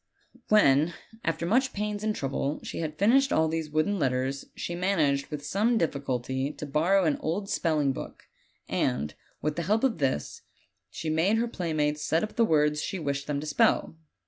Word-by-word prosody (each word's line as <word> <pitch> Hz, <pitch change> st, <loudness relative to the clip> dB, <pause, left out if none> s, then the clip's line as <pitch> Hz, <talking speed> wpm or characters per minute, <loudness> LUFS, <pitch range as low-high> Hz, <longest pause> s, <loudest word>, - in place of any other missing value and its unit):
"When, 160 Hz, -6 st, +4 dB, 0.3 s
after 165 Hz, 0 st, -1 dB
much 255 Hz, +8 st, +2 dB
pains 210 Hz, 0 st, -3 dB
and 215 Hz, -1 st, 0 dB
trouble, 140 Hz, +1 st, -2 dB
she -, -, -5 dB
had 155 Hz, -2 st, -4 dB
finished 265 Hz, +7 st, +4 dB
all 160 Hz, 0 st, +3 dB
these 160 Hz, -1 st, -2 dB
wooden 155 Hz, +7 st, 0 dB
letters, 130 Hz, 0 st, -1 dB
she 175 Hz, -, -4 dB
managed 160 Hz, -7 st, +1 dB
with 150 Hz, -2 st, -6 dB
some 215 Hz, +9 st, +2 dB
diffi 150 Hz, -7 st, 0 dB
culty 130 Hz, +2 st, -2 dB
to -, -, -5 dB
borrow 165 Hz, +7 st, +2 dB
tin 155 Hz, -4 st, +2 dB
old 195 Hz, +6 st, -2 dB
spelling 150 Hz, -5 st, +1 dB
book, -, -, -8 dB, 0.4 s
and, 70 Hz, +4 st, -1 dB, 0.3 s
with 150 Hz, +1 st, -1 dB
the -, -, 0 dB
help 220 Hz, +3 st, +2 dB
of 250 Hz, -10 st, +1 dB
this, 130 Hz, -, -1 dB, 0.5 s
she 155 Hz, +7 st, -4 dB
made 175 Hz, +8 st, +2 dB
her 235 Hz, +1 st, +1 dB
playmates 155 Hz, -7 st, -1 dB
set 165 Hz, +2 st, +1 dB
up 215 Hz, -, -5 dB
the 235 Hz, -, +4 dB
words 150 Hz, -5 st, +2 dB
she 190 Hz, -, -3 dB
wished 140 Hz, -4 st, -3 dB
them 145 Hz, -1 st, -1 dB
to -, -, -6 dB
spell. 150 Hz, +1 st, +2 dB
155 Hz, 185 wpm, -28 LUFS, 145-195 Hz, 0.5 s, When